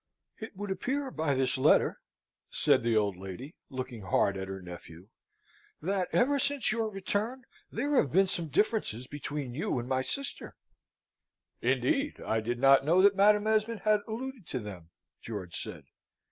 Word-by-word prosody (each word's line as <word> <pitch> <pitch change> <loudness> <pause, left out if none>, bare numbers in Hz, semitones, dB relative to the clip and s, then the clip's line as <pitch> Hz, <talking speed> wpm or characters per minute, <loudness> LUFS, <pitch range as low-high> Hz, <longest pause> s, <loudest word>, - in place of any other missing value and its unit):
"It 220 -2 -8
would 205 0 -5
appear 265 +7 -2
by 155 - 0
this 130 0 +1
letter," - - +4 0.5
said - - +3
the 115 -1 +2
old 100 -3 +1
lady, 95 - -8 0.2
looking 130 -4 -5
hard 95 +1 +2
at 95 0 -4
her 95 0 -5
nephew, 90 0 -11 0.7
"that 185 +2 -1
ever 280 +3 +3
since 280 -4 +2
your 225 0 0
return, 210 +6 -2 0.3
there 290 +1 -1
have 140 - +3
been 195 +5 +5
some 175 -3 -2
differences 155 - 0
between 145 -2 -5
you 140 -1 -1
and 120 0 -3
my 130 0 +1
sister." 275 - -4 1.1
"Indeed? 295 -2 +1
I 110 - 0
did 120 +2 -2
not 135 +2 +6
know 165 +6 +4
that 200 0 +6
Madam 205 +1 +5
Esmond 220 0 +1
had 215 -1 +3
alluded 235 -3 -6
to 130 - -3
them," 95 -7 -9 0.3
George 100 -6 -6
said. - - -8
155 Hz, 160 wpm, -30 LUFS, -, 1.1 s, not